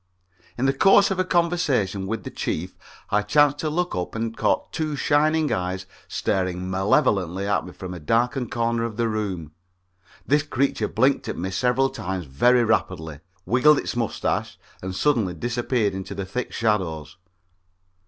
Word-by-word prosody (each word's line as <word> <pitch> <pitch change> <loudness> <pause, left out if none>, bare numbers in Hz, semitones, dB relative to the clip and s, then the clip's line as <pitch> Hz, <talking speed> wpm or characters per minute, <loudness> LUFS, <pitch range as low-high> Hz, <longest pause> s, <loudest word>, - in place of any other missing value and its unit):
In 125 - 0
the 135 - +3
course 195 +4 +5
of 190 - -1
a - - +4
conversation 160 - 0
with 110 +2 -3
the - - -7
Chief 90 +4 -3 0.4
I 105 - +3
chanced 145 +6 +3
to 155 - -1
look 175 +3 -1
up 90 +3 -4
and 115 0 -3
caught - - 0
two 155 -2 -2
shining 155 +2 +2
eyes 95 +1 -3 0.2
staring 90 -1 -1
malevolently 95 -1 +1
at 100 -2 0
me - - -8
from 90 0 -8
a 90 - -7
darkened 120 - 0
corner 115 0 0
of 115 -2 -4
the 115 -1 +1
room. 100 -8 -3 0.7
This 145 +2 +3
creature 140 -2 0
blinked 130 +4 +1
at - - -4
me 95 +3 -3
several 125 +6 +1
times 95 -8 -4
very 120 - +3
rapidly, 85 -9 -1 0.3
wiggled 145 +5 +5
its - - -3
mustache 115 -3 -2 0.2
and 95 0 -5
suddenly 110 - +1
disappeared 120 +1 -1
into 95 +1 -6
the 100 0 -4
thick 125 +7 -4
shadows. 90 -8 -1
115 Hz, 165 wpm, -24 LUFS, 95-135 Hz, 0.7 s, course